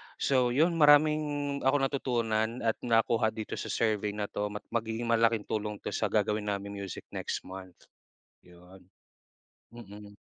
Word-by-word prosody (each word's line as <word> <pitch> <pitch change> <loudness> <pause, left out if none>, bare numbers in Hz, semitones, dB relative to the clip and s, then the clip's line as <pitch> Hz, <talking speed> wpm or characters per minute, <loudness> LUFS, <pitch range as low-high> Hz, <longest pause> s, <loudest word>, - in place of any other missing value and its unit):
So 125 -3 +1
yun 160 +5 +4
maraming 145 -1 +4
akong 135 +1 +2
natutunan 120 -4 -1
at 115 -1 0
nakuha 115 -1 +2
dito 110 -1 -5
sa - - -5
survey 105 -2 0
na 105 - -2
to. 105 - -2
Ma 105 0 -7
magiging 115 0 -2
malaking 115 -2 +3
tulong 105 -1 -3
ito - - -3
sa - - 0
gagawin 105 0 0
namin 100 0 -3
music 95 -3 -6
next - - -4
month 95 -1 -10 0.6
yun. 90 +1 -18 0.8
Mm. 105 -3 -11
110 Hz, 145 wpm, -29 LUFS, 105-125 Hz, 0.8 s, yun